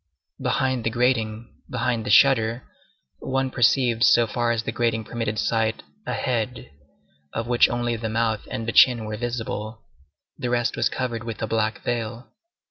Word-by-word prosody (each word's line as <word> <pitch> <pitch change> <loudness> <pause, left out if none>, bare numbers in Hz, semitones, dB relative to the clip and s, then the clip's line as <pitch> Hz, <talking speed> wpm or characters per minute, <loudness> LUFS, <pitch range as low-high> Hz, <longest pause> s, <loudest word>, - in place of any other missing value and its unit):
Behind 130 -2 0
the 115 - +1
grating, 115 -2 -1
behind 120 -2 -1
the - - -1
shutter, 120 0 +4 0.6
one 135 0 -1
perceived 120 -1 +2
so 120 -1 +6
far 120 +2 -1
as 115 -1 -1
the - - -3
grating 115 -2 0
permitted 115 -1 -3
sight, 110 +1 0 0.2
a - - -1
head, 120 - -3 0.6
of 115 - -2
which 120 0 +4
only 120 0 -1
the 110 -1 -4
mouth 110 -1 -1
and 115 - -4
the - - 0
chin 120 -3 +5
were 110 0 -4
visible; 110 -1 -4 0.6
the 125 - -2
rest 120 0 0
was - - +1
covered 120 -3 -3
with 115 -2 -6
a - - +2
black 110 -1 -1
veil. 115 -1 -4
115 Hz, 165 wpm, -24 LUFS, 110-120 Hz, 0.6 s, so